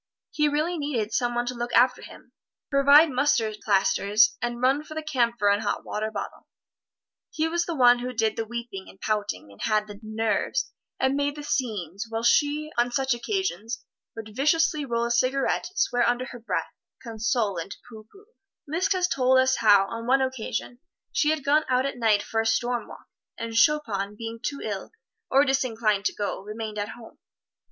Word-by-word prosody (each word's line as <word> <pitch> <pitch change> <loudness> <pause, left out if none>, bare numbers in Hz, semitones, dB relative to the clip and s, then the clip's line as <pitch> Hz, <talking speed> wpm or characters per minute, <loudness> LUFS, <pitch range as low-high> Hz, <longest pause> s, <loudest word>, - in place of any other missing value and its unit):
He 300 -1 +2
really 310 +4 -1
needed 240 -7 -2
some 240 -1 0
one 240 0 0
to 250 - -3
look 240 0 -4
after 250 +1 +4
him, - - -13 0.4
provide 280 +3 +6
mustard 245 -5 +1
plasters 200 +2 +3
and 240 0 -3
run 265 +4 +2
for 310 - -10
the 315 - -4
camphor 240 -8 +1
and 205 +1 +1
hot 205 -2 -2
water 215 +1 -3
bottle. 205 -2 -7 0.8
He 315 +1 -1
was 340 +1 0
the 340 - -2
one 245 -3 +6
who 250 +1 -4
did 225 -2 0
the 225 - -2
weeping 235 -5 -6
and 190 - -16
pouting, 210 - -3
and 100 - -15
had 215 -1 +1
the 205 -1 -11
"nerves" 220 +4 -1 0.3
and 265 0 +2
made 285 0 0
the 295 - -8
scenes; 210 - -3
while 225 0 -3
she, 295 +4 +2
on 240 +1 +2
such 265 +1 +1
occasions, 240 - -3 0.3
would 220 -1 -9
viciously 305 +2 +2
roll 235 -2 -1
a 235 - -2
cigarette, 255 +3 +1
swear 245 -10 +2
under 245 +1 -1
her 245 - -9
breath, 230 - -3 0.3
console 225 -3 -1
and 180 +4 -7
pooh 220 -3 -12
pooh. 395 +1 -18 0.4
Liszt 360 +7 +1
has 365 -1 +1
told 260 -4 +3
us 260 0 +3
how, 205 -3 +5
on 230 0 -6
one 265 +1 +4
occasion, 245 -1 -4 0.3
she 300 - +2
had 310 -3 -1
gone 300 +2 +4
out 255 +1 +2
at 275 -2 -4
night 215 -3 +3
for 225 - -1
a - - -4
storm 240 +1 0
walk, - - -12 0.3
and 230 0 -5
Chopin, 225 -7 +2
being 230 0 -6
too 280 -1 -4
ill, 205 - -5 0.4
or 275 +2 +4
disinclined 230 -7 0
to - - 0
go, 205 -2 -3
remained 215 +1 -6
at 205 - -3
home. 230 -2 -12
240 Hz, 190 wpm, -25 LUFS, 220-275 Hz, 0.8 s, provide